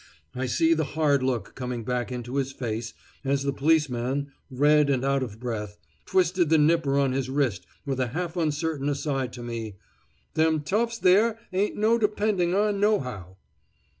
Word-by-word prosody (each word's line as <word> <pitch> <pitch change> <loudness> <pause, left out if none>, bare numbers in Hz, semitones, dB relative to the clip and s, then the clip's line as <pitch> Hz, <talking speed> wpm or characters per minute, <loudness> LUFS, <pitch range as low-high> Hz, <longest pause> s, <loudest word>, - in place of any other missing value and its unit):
I 130 0 -2
see 160 +6 +3
the 160 -1 +1
hard 145 -3 +3
look 130 -3 -2
coming 125 -2 -4
back 125 +1 -2
into 125 +2 -4
his 135 -1 -1
face 115 -3 -4 0.3
as 140 0 0
the 140 0 -1
policeman, 140 -2 +1 0.2
red 145 +2 +3
and 135 -1 +1
out 140 0 +1
of 110 -4 -5
breath, 105 -4 -4 0.3
twisted 180 -2 +2
the 160 - +5
nipper 150 -2 +3
on 140 -2 +2
his 130 0 -2
wrist, 130 -10 -1 0.2
with 135 -2 -2
a 130 - +1
half 170 +7 -4
uncertain 155 -3 -1
aside 140 -3 -2
to 120 - -8
me: 115 -3 -5 0.6
"Them 160 -1 +2
toughs 230 +9 0
there 215 +4 +4 0.2
ain't 195 +3 0
no 220 +3 +3
depending 205 -4 +1
on 205 0 +1
nohow." 125 - -1
140 Hz, 165 wpm, -26 LUFS, 125-165 Hz, 0.6 s, the